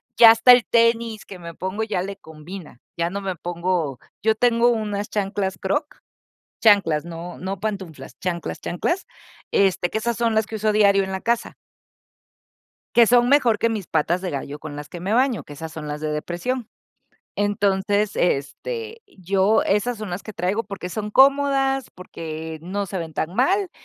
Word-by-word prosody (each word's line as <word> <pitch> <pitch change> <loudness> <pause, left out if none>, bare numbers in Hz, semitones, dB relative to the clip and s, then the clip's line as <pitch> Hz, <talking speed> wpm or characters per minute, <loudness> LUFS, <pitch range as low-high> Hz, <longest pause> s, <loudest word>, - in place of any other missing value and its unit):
ya 230 - +9
hasta 225 +2 +6
el 245 -1 +7
tenis 230 -1 +2
que 190 - -10
me 170 -1 -9
pongo 190 +4 -4
ya 210 -5 -1
le 200 +1 -5
combina, 160 -2 -11 0.2
ya 170 0 0
no 200 +3 -4
me 190 -2 -3
pongo 170 -4 -2 0.2
yo 220 +1 +3
tengo 235 +1 +3
unas 210 -3 -2
chanclas 195 -2 -2
Crocs, 290 - -2 0.6
chanclas, 195 -9 +4
no, 170 +1 -7
no 190 0 -5
pantuflas 190 -10 -5
chanclas, 175 -2 -3
chanclas, 345 - -2 0.5
este, 190 -3 +2
que - - -1
esas 235 +1 -1
son 230 -1 +1
las 220 -1 +2
que 220 - -5
uso 215 0 +1
diario 200 -2 +4
en 190 - -5
la 190 - -3
casa. 235 +2 -1 1.4
Que 235 -2 +7
son 245 0 +5
mejor 250 -6 +4
que 230 - +2
mis 210 -5 -4
patas 165 +3 +1
de 185 -1 -3
gallo 140 +1 -5
con 145 -2 -7
las 145 0 -7
que 175 - -8
me 190 +4 -2
baño, 250 -1 +2
que - - -12
esas 160 +2 -7
son 155 -2 -7
las 150 0 -4
de 155 0 -2
depresión. 195 +11 -3 0.7
Entonces, 205 0 +1
este, 450 - -2 0.2
yo 195 +3 +2
esas 220 +5 0
son 215 -3 -6
las 175 +3 -5
que 215 - -7
traigo 195 +5 -1
porque 195 -3 -6
son 210 +2 -5
cómodas, 270 -1 +4
porque 160 -3 -7
no 200 +4 -3
se 190 0 -5
ven 165 -2 -6
tan 160 - -2
mal 370 - +2
200 Hz, 180 wpm, -23 LUFS, 175-230 Hz, 1.4 s, ya